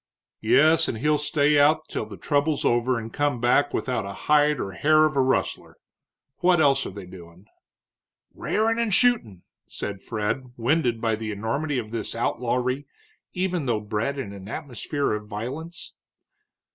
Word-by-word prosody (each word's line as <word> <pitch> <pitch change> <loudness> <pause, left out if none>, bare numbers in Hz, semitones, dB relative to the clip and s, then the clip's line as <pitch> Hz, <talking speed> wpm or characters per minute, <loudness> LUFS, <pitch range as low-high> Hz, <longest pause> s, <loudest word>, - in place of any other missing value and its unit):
"Yes, 160 +2 +4
and 115 - -3
he'll 150 +5 +1
stay 150 0 +2
out 155 +2 +3
till 110 - -4
the 100 -2 -10
trouble's 145 0 0
over 120 +1 +2
and 115 0 -7
come 145 -4 0
back 125 +4 +3
without 125 -5 -2
a 100 0 -6
hide 150 -1 +4
or 95 - -3
hair 155 +9 +4
of 155 -2 -1
a 135 - +3
rustler. 130 0 -1 0.6
What 180 -1 +3
else 140 -2 +3
are - - -5
they 100 -1 -9
doin'?" 90 0 -14 0.9
"Rairin' 225 +2 0
and 230 -2 0
shootin'," 185 - +2 0.2
said 100 -1 -5
Fred, 115 +4 -3
winded 120 -1 +1
by 115 -1 +1
the 110 0 -5
enormity 130 +8 -2
of 110 -3 -4
this 115 -1 -4
outlawry, 125 +3 -1 0.5
even 180 -5 -1
though 115 -3 +1
bred 105 +6 -2
in 110 -7 -5
an 100 -1 -10
atmosphere 140 0 -3
of 105 0 -5
violence. 130 +11 -6
130 Hz, 160 wpm, -25 LUFS, 110-150 Hz, 0.9 s, Yes